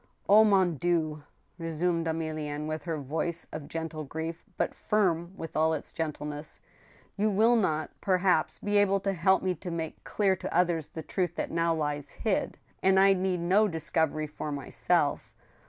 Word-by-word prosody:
"Omon 195 -5 +5
Dieu!" 160 -3 0 0.4
resumed 165 +1 -1
Emilienne, 155 -2 -3
with 155 +2 -4
her 165 -2 -2
voice 160 +4 -3
of 155 -2 -6
gentle 160 -1 -4
grief, 160 +3 -5
but - - 0
firm 175 -5 0
with 165 - -7
all 160 +1 +3
its 150 - -7
gentleness, 150 -1 -5 0.3
" - - -29
you 215 +1 +3
will 220 +4 +4
not, 155 -8 0
perhaps, 185 -1 +2
be 205 0 0
able 195 -1 +3
to 195 0 -1
help 190 +2 +3
me 185 -1 +1
to 180 +2 -7
make 165 -2 -5
clear 195 -2 +1
to - - -6
others 170 -4 +2
the 160 - -7
truth 180 +2 -2
that - - -3
now 165 0 +1
lies 145 -2 -2
hid, 215 -4 -1 0.2
and 190 0 +4
I 195 0 +6
need 185 -2 -1
no 195 +5 +4
discovery 160 -3 0
for 150 0 -6
myself. 140 -2 0
165 Hz, 170 wpm, -29 LUFS, 155-190 Hz, 0.4 s, I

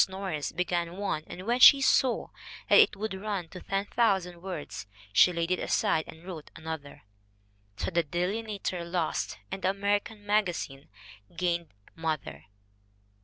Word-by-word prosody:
Norris 190 -6 -3
began 175 0 -2
one, 195 -6 -2
and 185 - -8
when 240 +2 +1
she 275 +2 +10
saw 265 -2 +2 0.4
that - - +8
it 430 -2 +6
would 215 0 -3
run 190 -3 -4
to 180 - -9
10,000 195 -3 0
words, 160 - -6 0.3
she 180 - +7
laid 170 0 -2
it 185 - +2
aside 160 - +1
and 160 +1 -12
wrote 170 -5 -8
another. 160 -3 -7 0.7
So - - -2
the 170 0 +3
Delineator 185 +3 -2
lost 170 -1 -2
and 190 0 -4
the 185 - +2
American 205 +2 -1
Magazine 180 -10 -1 0.5
gained 170 -1 0 0.3
Mother. 155 - -4
180 Hz, 140 wpm, -29 LUFS, 165-200 Hz, 0.7 s, she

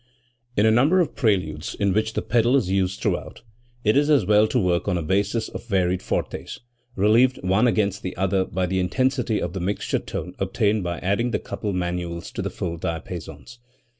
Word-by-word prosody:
In 105 - +4
a 110 - +5
number 140 +11 +4
of 175 - +1
preludes 90 - 0
in 100 -2 +1
which 110 +2 0
the - - -2
pedal 120 +3 +3
is 110 -9 +1
used 95 0 0
throughout, - - -3 0.4
it 105 +2 +3
is 145 +2 +3
as 140 -10 +4
well 105 +2 +5
to 125 - -1
work 90 -5 +1
on 95 -3 +1
a 85 - -2
basis 100 +6 0
of - - -8
varied 95 -3 +1
fortes, - - -3 0.4
relieved 115 +6 +4
one 95 +6 +3
against 100 -3 +1
the 90 - -5
other 95 0 +1
by 95 0 -2
the 95 +1 -1
intensity 120 +4 0
of 85 0 -3
the 95 - -3
mixture 95 +4 -1
tone 90 +3 -6
obtained 100 +1 +1
by 85 -1 -3
adding 100 +6 0
the - - 0
coupled 105 -3 -4
manuals 85 -1 -3
to - - -4
the - - -2
full 85 -1 -4
diapasons. 85 +9 -6
100 Hz, 195 wpm, -23 LUFS, 90-110 Hz, 0.4 s, a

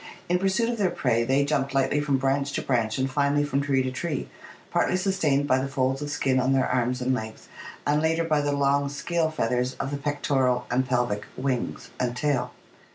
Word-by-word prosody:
In 180 +1 +2
pursuit 195 +4 +1
of 235 -1 -2
their 190 -3 +3
prey 115 -8 +1
they 135 +4 +2
jumped 140 -2 -1
lightly 135 +2 +2
from 145 -2 +1
branch 140 +1 0
to - - -2
branch 115 -4 0
and 130 0 +1
finally 145 +2 +1
from 140 -1 0
tree 135 -2 +1
to 130 - -2
tree, 145 +2 -3 0.4
partly 185 - +2
sustained 175 -7 +1
by 130 -1 +3
the 135 - -2
folds 135 0 0
of 145 - -4
skin 135 -2 +1
on 130 +1 +2
their 130 -1 +2
arms 125 0 0
and 130 +1 +1
legs 110 -3 -6 0.4
and 150 +1 +2
later 165 +1 +1
by 155 -3 +1
the 145 0 0
long 140 0 +2
scale 160 +3 -1
feathers 125 -3 -1
of 135 - -4
the 145 - -2
pectoral 140 -3 0
and 130 +1 +1
pelvic 120 -5 0
'wings' 130 -2 -3
and 125 -1 -1
tail. 125 -3 0
135 Hz, 210 wpm, -26 LUFS, 130-145 Hz, 0.4 s, their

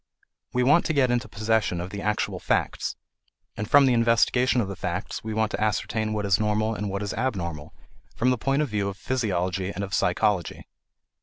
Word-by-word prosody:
We 125 - +1
want 145 +7 +5
to 160 - 0
get 130 -4 +3
into 120 +1 0
possession 110 -4 0
of 90 +2 -5
the 100 - -5
actual 105 0 -1
facts, - - -1 0.6
and 105 +1 -5
from 145 -1 +7
the 130 - +4
investigation 120 +2 +3
of 110 - 0
the 100 - -5
facts - - -4
we 110 - -4
want 110 -1 +1
to - - -3
ascertain 110 +1 -1
what 105 -1 -2
is 100 +1 +3
normal 110 +1 +1
and 105 -1 -3
what 100 +1 -3
is 100 - -3
abnormal, 85 - -3 0.4
from 125 +2 +2
the 125 - +1
point 135 +5 +1
of 145 - -3
view 100 -2 -1
of 100 - -8
physiology 95 -7 -1
and 100 0 -4
of 100 -1 -6
psychology. 95 -4 0
110 Hz, 205 wpm, -25 LUFS, 100-125 Hz, 0.6 s, from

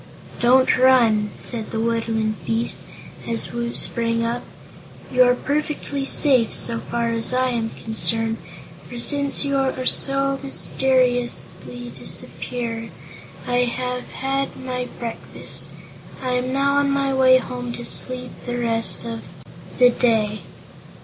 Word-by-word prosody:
"Don't 255 +2 +4
run," 230 -5 +5
said 225 -3 -4
the 220 - -3
woodland 225 -1 -1
beast, 225 +1 -2 0.5
as 230 -1 -1
Woot 235 0 -3
sprang 230 0 +1
up; 235 +1 -1 0.7
"you 255 - +4
are 250 0 +6
perfectly 290 0 -2
safe, 260 -5 +3
so 230 - +1
far 235 0 -2
as 230 +2 -1
I 255 0 +2
am 230 -2 -1
concerned, 225 0 0 0.5
for 245 - -7
since 280 +4 +3
you 280 - -1 0.3
so 275 0 +1
mysteriously 245 -2 -1
disappeared 230 -2 -5 0.6
I 245 0 0
have 250 0 -3
had 270 +1 -2
my 250 -1 -4
breakfast. 230 -1 -5 0.5
I 255 - -3
am 250 +1 0
now 280 +1 +2
on 285 0 +3
my 275 -1 +1
way 260 -1 +6
home 245 -1 -4
to 240 - -6
sleep 250 -1 -1 0.2
the 245 0 -2
rest 230 -1 +2
of 230 -1 -4 0.6
the 250 -1 +7
day." 220 -4 +1
245 Hz, 130 wpm, -22 LUFS, 230-260 Hz, 0.7 s, the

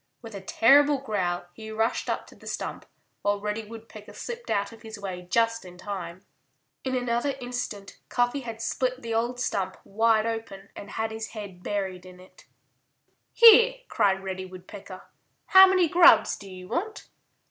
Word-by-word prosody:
With 225 -1 -9
a 200 - -7
terrible 280 +8 +5
growl 190 -9 -2
he 220 +2 -10
rushed 225 +2 -1
up - - -2
to - - -17
the - - -16
stump, - - -5 0.3
while 205 0 0
Reddy 210 +2 -3
Woodpecker 225 -1 -11
slipped 480 0 -7
out 200 +2 0
of 230 - -14
his 220 -1 -9
way 185 -3 -7
just 230 +2 +1
in 180 -1 -12
time. 185 -2 -7 0.6
In 260 -1 -2
another 245 +2 -1
instant 245 -5 -6
Cuffy 245 +3 +1
had 230 -3 -7
split 255 0 -2
the 230 -1 -3
old 240 +2 -1
stump 195 -6 -2
wide 220 +1 +2
open 225 -4 -5
and 200 - -9
had 220 +2 -3
his 220 0 -6
head 195 -4 -8
buried 190 -2 -4
in 180 0 -14
it. 185 - -18 0.8
"Here!" 465 +2 +8
cried 195 -1 +1
Reddy 185 -1 -5
Woodpecker. 185 +1 -11 0.4
"How 380 -1 +9
many 370 -2 +3
grubs 335 -10 +6
do 200 - -12
you 185 -1 -10
want?" 420 - -4
220 Hz, 170 wpm, -26 LUFS, 195-245 Hz, 0.8 s, How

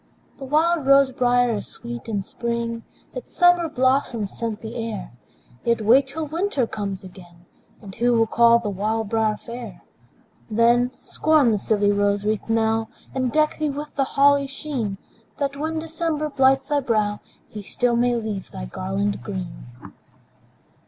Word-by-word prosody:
The 270 - -6
wild 310 +1 +2
rose 275 -1 +6
briar 245 -2 +2
is - - -6
sweet 235 0 -8
in 205 -3 -1
spring, 235 +1 -3 0.3
Its - - -8
summer 355 -2 +4
blossoms 255 -6 0
scent 225 -2 -4
the 225 0 -7
air; 225 -2 -5 0.5
Yet 235 0 +1
wait 255 +6 +5
till 310 +3 -4
winter 315 -3 -1
comes 200 -3 -5
again, 175 -2 -14 0.4
And 195 -2 -9
who 240 +4 +1
will 225 -1 +4
call 235 +1 +5
the 225 -3 -3
wild 215 +2 -2
briar 220 -1 +1
fair? 235 0 -9 0.7
Then, 235 +3 +3
scorn 305 -6 +3
the 210 - +1
silly 205 0 +2
rose 205 0 +1
wreath 215 +1 -1
now, 225 0 +1 0.2
And 255 -2 -1
deck 305 +2 +1
thee 305 -1 0
with 295 +2 -6
the 275 - +1
holly's 280 0 +4
sheen, 265 -8 -4 0.4
That, 280 -1 -2
when 315 +3 -3
December 320 -1 -2
blights 270 -1 +3
thy 290 0 +1
brow, 215 -5 0 0.3
He 210 - -8
still 240 +4 0
may 240 +1 +2
leave 215 -4 -4
thy 60 - -7
garland 195 - -2
green. - - -6
235 Hz, 160 wpm, -23 LUFS, 210-275 Hz, 0.7 s, rose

